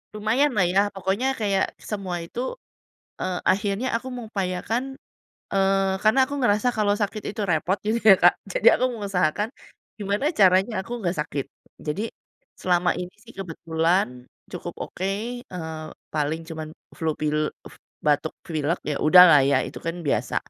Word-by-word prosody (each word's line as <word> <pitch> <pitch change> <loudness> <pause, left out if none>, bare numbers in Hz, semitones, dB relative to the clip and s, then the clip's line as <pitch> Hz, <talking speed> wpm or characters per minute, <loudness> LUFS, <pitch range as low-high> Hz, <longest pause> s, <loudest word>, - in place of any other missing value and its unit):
lumayanlah 220 -1 +2
ya, 195 - +3 0.2
pokoknya 195 +7 0
kayak 200 -3 +2
semua 190 -4 -4
itu, 170 - -8 0.8
eee, 185 -1 -2
akhirnya 205 +5 -1
aku 255 - -9
mengupayakan, 215 0 -2 0.7
eee, 195 0 +2
karena 220 +5 +4
aku 285 - -4
ngerasa 215 +1 +3
kalau 205 -1 +3
sakit 210 0 -3
itu 215 - -5
repot 175 +4 +1
gitu 230 +2 +1
ya, 205 -3 +9
Kak, 175 - +8 0.2
jadi 220 - +2
aku 255 - +2
mengusahakan, 200 -1 0 0.5
gimana 205 +6 -1
caranya 190 +3 +5
aku 235 - -13
nggak 175 -2 -1
sakit. 145 -3 -3 0.4
Jadi 155 +8 -3 0.6
selama 180 -1 +2
ini 180 0 -5
sih 235 - -14
kebetulan 165 -6 -1 0.2
cukup - - -6
oke, 190 - -4 0.4
eee, 160 -3 -6 0.3
paling 155 +2 -1
cuman 160 -1 -5 0.3
flu 160 -1 0
pil 150 0 0 0.2
f - - -16 0.3
batuk 150 +1 +2
pilek 160 +1 -1
ya 145 - -1
udahlah 165 -2 +8
ya 140 +1 +3
itu - - -9
kan 165 +1 -3
biasa. - - 0
190 Hz, 145 wpm, -24 LUFS, 160-210 Hz, 0.8 s, ya